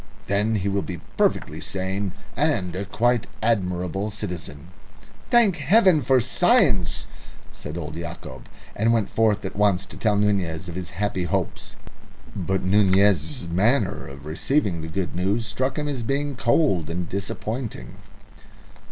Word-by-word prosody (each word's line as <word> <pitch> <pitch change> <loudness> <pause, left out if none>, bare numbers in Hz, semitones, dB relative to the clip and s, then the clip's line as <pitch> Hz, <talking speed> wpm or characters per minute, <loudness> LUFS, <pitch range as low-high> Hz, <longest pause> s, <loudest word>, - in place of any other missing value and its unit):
"Then 105 +3 +1
he 100 -1 -1
will 100 0 +1
be 90 -4 -6 0.2
perfectly - - 0
sane, 95 0 -3 0.2
and 90 -2 0
a 100 +2 -3
quite 120 +4 +1 0.2
admirable 95 -2 0
citizen." 90 -7 -6 0.6
"Thank 225 -7 +5
Heaven 175 +2 +5
for 130 +1 +4
science!" 130 - +3 0.5
said 75 +3 -7
old 80 -2 -5
Yacob, 80 -6 -8 0.3
and 115 +3 +2
went 110 -4 0
forth 105 -2 +2
at 95 - -5
once 100 -2 +2
to - - -12
tell 105 -2 +2
Nunez 95 -4 0
of 85 - -6
his 90 0 -5
happy 95 0 -2
hopes. 85 - -3 0.6
But 95 0 -1
Nunez's 100 - +3
manner 100 +4 +1
of 70 +1 -11
receiving 90 - 0
the 80 - -6
good 90 +1 -3
news 100 +6 0
struck 130 +6 -2
him 150 -1 -1
as 140 -4 -2
being 140 +4 -1
cold 115 - +2
and 85 +1 -3
disappointing. 105 +5 -5
100 Hz, 145 wpm, -24 LUFS, 90-115 Hz, 0.6 s, Thank